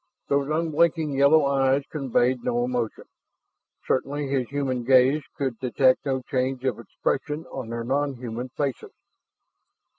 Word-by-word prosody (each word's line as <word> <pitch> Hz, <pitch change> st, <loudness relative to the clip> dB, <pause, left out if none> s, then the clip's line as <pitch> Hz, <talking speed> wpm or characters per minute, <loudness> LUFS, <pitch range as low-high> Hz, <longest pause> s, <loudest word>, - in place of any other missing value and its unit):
Those 140 Hz, 0 st, +1 dB
unblinking 160 Hz, 0 st, +1 dB
yellow 140 Hz, +2 st, +5 dB
eyes 135 Hz, 0 st, +2 dB
conveyed 130 Hz, -3 st, +1 dB
no 120 Hz, 0 st, 0 dB
emotion; 120 Hz, -3 st, -2 dB, 0.8 s
certainly 140 Hz, +2 st, -1 dB
his 135 Hz, -3 st, -1 dB
human 135 Hz, -3 st, -2 dB
gaze 130 Hz, +4 st, +4 dB, 0.2 s
could 130 Hz, -5 st, -2 dB
detect 130 Hz, +2 st, +2 dB
no 130 Hz, -1 st, -1 dB
change 130 Hz, -1 st, -2 dB
of 130 Hz, -5 st, 0 dB
expression 150 Hz, +3 st, -3 dB
on 130 Hz, -4 st, -6 dB
their 115 Hz, 0 st, -4 dB
nonhuman 130 Hz, -2 st, -2 dB
faces. 140 Hz, -4 st, -3 dB
135 Hz, 125 wpm, -25 LUFS, 125-145 Hz, 0.8 s, yellow